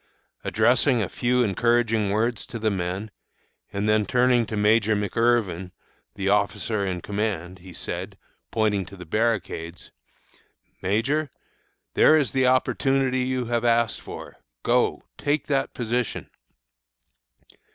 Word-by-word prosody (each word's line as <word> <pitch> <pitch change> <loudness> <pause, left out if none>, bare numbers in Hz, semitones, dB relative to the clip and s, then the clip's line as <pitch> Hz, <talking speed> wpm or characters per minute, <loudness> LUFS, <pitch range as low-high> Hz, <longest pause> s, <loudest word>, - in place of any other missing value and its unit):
Addressing 125 +1 +3
a - - -2
few 125 0 +1
encouraging 115 0 +2
words 110 +3 0
to - - -6
the 110 -1 0
men, 95 +3 -3 0.6
and 100 +1 -2
then 105 -1 +2
turning 125 -1 +3
to 110 - -4
Major 105 +1 +3
McIrvin, 105 -4 0 0.4
the 100 -1 -3
officer 100 +1 +1
in 90 -2 -2
command, 95 -3 -3
he 90 +1 -12
said, - - -5 0.3
pointing 105 -3 +1
to 100 - -11
the 90 - -9
barricades: 90 -4 -2 0.9
'Major, 130 +11 0 0.6
there 155 - +6
is 140 -8 +1
the 130 -1 +2
opportunity 130 0 +2
you 125 0 -1
have 120 0 -1
asked 115 -1 +2
for. - - -9 0.3
Go, - - +1 0.2
take 145 +1 0
that 135 -2 -1
position!' 120 -1 -2
110 Hz, 125 wpm, -25 LUFS, 100-125 Hz, 0.9 s, there